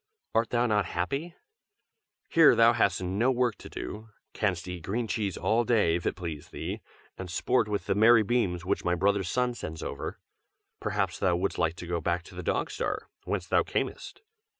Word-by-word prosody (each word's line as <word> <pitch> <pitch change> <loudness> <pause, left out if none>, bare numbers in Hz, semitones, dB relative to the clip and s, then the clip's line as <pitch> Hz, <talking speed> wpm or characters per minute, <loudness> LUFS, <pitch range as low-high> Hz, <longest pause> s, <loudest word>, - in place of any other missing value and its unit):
Art 115 +1 +2
thou 120 0 +2
not 105 -4 +2
happy? 140 - -2 0.9
here 165 -2 +6
thou 115 +1 +6
hast 100 -5 +1
no 100 +8 +1
work 125 -3 +1
to - - -10
do; 110 +1 -7 0.2
canst 95 -4 -1
eat 90 -1 -5
green 110 +8 -2
cheese 100 -2 -2
all 115 +2 +2
day, 110 -8 +3
if 85 - -2
it - - 0
please 80 -5 -6
thee, - - -5 0.4
and 95 -1 -6
sport 125 +7 +1
with 105 -1 -2
the - - +1
merry 110 +2 +6
beams 95 -6 0
which 100 +2 0
my 90 0 +1
brother 100 +3 +2
Sun 125 +7 0
sends 80 -8 -6
over. - - -5 0.6
Perhaps 95 -4 -1
thou 90 -3 +2
wouldst 95 +3 -1
like 80 0 +1
to 90 - -8
go 85 -1 -2
back 85 +2 -1
to - - -14
the 90 - -6
Dog - - -1
Star, - - -3 0.2
whence - - -2
thou - - +3
camest. - - -4
100 Hz, 195 wpm, -28 LUFS, 90-115 Hz, 0.9 s, here